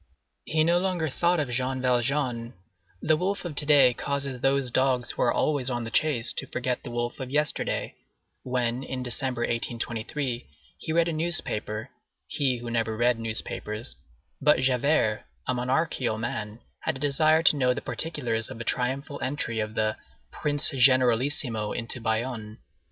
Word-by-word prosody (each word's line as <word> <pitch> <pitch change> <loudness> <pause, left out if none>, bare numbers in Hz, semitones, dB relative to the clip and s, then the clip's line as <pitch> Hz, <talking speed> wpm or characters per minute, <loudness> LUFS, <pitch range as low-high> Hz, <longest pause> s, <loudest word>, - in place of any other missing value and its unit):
He 155 0 +2
no 170 +2 +4
longer 180 -4 0
thought 170 +5 +1
of 145 -5 -1
Jean 130 +2 -1
Valjean,—the 120 - -1
wolf 190 +3 -1
of 170 - -4
to 145 +1 0
day 140 -4 +7
causes 140 -1 -3
these 135 -2 +1
dogs 130 -1 +1
who - - -5
are - - +4
always 140 -4 +1
on 120 -1 -2
the 115 - -6
chase 130 -6 +1
to - - -3
forget 125 0 -2
the - - -8
wolf 120 +1 -3
of 130 -2 -5
yesterday,—when, 130 -3 -2
in 130 -1 -4
December, 125 0 -2
1823, 120 +2 -2 0.3
he - - -4
read 170 +1 +3
a 170 - -1
newspaper, 130 -8 -1 0.3
he 135 -4 0
who 120 0 -6
never 115 -1 0
read 120 0 +2
newspapers; 110 - -3 0.5
but 150 -3 +4
Javert, 130 -3 +2 0.2
a 130 - 0
monarchical 125 -1 0
man, 110 0 -4 0.2
had - - -1
a - - -6
desire 155 +3 +3
to 160 - +6
know 130 -3 +3
the - - -2
particulars 120 -9 -1
of - - -7
the 115 - -5
triumphal 135 +4 -2
entry 130 -4 -2
of 110 0 -3
the 110 0 0 0.3
"Prince 145 0 0
Generalissimo" 125 -3 +3
into 115 +1 -5
Bayonne. 110 -1 -2
125 Hz, 155 wpm, -27 LUFS, 115-145 Hz, 0.5 s, day